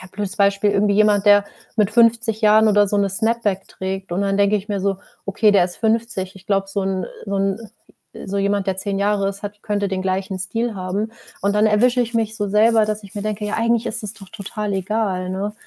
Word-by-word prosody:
ja, 185 Hz, -, -10 dB
blödes 205 Hz, -2 st, -3 dB
Beispiel, 200 Hz, 0 st, +2 dB
irgendwie 200 Hz, 0 st, +2 dB
jemand, 210 Hz, -1 st, +3 dB
der 205 Hz, 0 st, +6 dB, 0.3 s
mit 210 Hz, -2 st, +2 dB
50 230 Hz, -1 st, +3 dB
Jahren 215 Hz, 0 st, +5 dB
oder 205 Hz, -1 st, +4 dB
so 205 Hz, -, 0 dB
'ne 200 Hz, -1 st, +1 dB
Snapback 220 Hz, -1 st, -1 dB
trägt 190 Hz, -1 st, -5 dB
und 190 Hz, +3 st, 0 dB
dann 195 Hz, 0 st, 0 dB
denke 200 Hz, +1 st, +3 dB
ich 210 Hz, +1 st, -6 dB
mir 200 Hz, -1 st, -2 dB
so: 195 Hz, 0 st, 0 dB, 0.3 s
„Okay, 205 Hz, +2 st, +3 dB
der 195 Hz, -3 st, +4 dB
ist 175 Hz, -, -6 dB
50. 220 Hz, -4 st, -1 dB
Ich 190 Hz, -, -16 dB
glaube, 195 Hz, -1 st, 0 dB
so 200 Hz, +1 st, -2 dB
'n, 190 Hz, -2 st, -1 dB
äh -, -, -9 dB, 0.2 s
so 200 Hz, 0 st, -2 dB
'n 195 Hz, +3 st, -2 dB, 0.6 s
so 200 Hz, +1 st, -2 dB
jemand, 200 Hz, 0 st, 0 dB
der 190 Hz, -1 st, -1 dB
10 195 Hz, 0 st, -2 dB
Jahre 200 Hz, -1 st, +1 dB
ist, 200 Hz, 0 st, -7 dB
hat 205 Hz, 0 st, -7 dB
könnte 205 Hz, -1 st, -1 dB
den 190 Hz, -1 st, -2 dB
gleichen 190 Hz, 0 st, -2 dB
Stil 225 Hz, +5 st, -2 dB
haben.“ 195 Hz, +4 st, -3 dB, 0.3 s
Und 200 Hz, +1 st, +1 dB
dann 210 Hz, +1 st, +4 dB
erwische 240 Hz, +4 st, +3 dB
ich 235 Hz, 0 st, -2 dB
mich 220 Hz, -1 st, 0 dB
so 205 Hz, -2 st, -2 dB
selber, 215 Hz, +1 st, +4 dB
dass 215 Hz, 0 st, -3 dB
ich 200 Hz, +1 st, -12 dB
mir 205 Hz, -, -3 dB
denke: 215 Hz, 0 st, -3 dB
„Ja, 210 Hz, -, -2 dB
eigentlich 230 Hz, 0 st, +1 dB
ist 225 Hz, +1 st, -3 dB
es 210 Hz, +1 st, -5 dB
doch 195 Hz, -4 st, -12 dB
total 210 Hz, +1 st, -4 dB
egal“, 190 Hz, -1 st, -1 dB
ne, 195 Hz, +3 st, -3 dB
205 Hz, 235 wpm, -20 LUFS, 195-215 Hz, 0.6 s, der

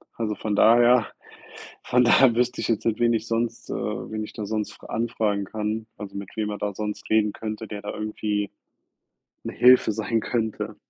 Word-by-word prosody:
also, 110 Hz, -2 st, -2 dB
von 105 Hz, -2 st, -2 dB
daher 120 Hz, +1 st, +5 dB, 0.8 s
von 125 Hz, 0 st, +3 dB
daher 120 Hz, 0 st, +5 dB
wüsste 125 Hz, +1 st, 0 dB
ich -, -, -2 dB
jetzt 115 Hz, -, 0 dB
nicht, 115 Hz, -1 st, 0 dB
wen 120 Hz, 0 st, +3 dB
ich 110 Hz, -1 st, -2 dB
sonst 115 Hz, 0 st, -2 dB
äh, -, -, -2 dB
wen 110 Hz, 0 st, -4 dB
ich 105 Hz, -, -9 dB
da 105 Hz, -, -5 dB
sonst 105 Hz, 0 st, -3 dB
fra -, -, -15 dB
anfragen 110 Hz, -3 st, -1 dB
kann, 110 Hz, +2 st, -3 dB
also, 100 Hz, -1 st, -8 dB
mit 100 Hz, -1 st, -6 dB
wem 110 Hz, -, -1 dB
man 105 Hz, -, -5 dB
da 105 Hz, -1 st, -2 dB
sonst 105 Hz, +1 st, -5 dB
reden 105 Hz, -1 st, +3 dB
könnte, 110 Hz, 0 st, -6 dB
der 105 Hz, -1 st, -6 dB
da 105 Hz, -, -5 dB
irgendwie 105 Hz, -1 st, -3 dB, 0.9 s
'ne -, -, -4 dB
Hilfe 125 Hz, -3 st, +6 dB
sein 110 Hz, +1 st, -1 dB
könnte. 110 Hz, -2 st, -3 dB
110 Hz, 195 wpm, -24 LUFS, 105-115 Hz, 0.9 s, Hilfe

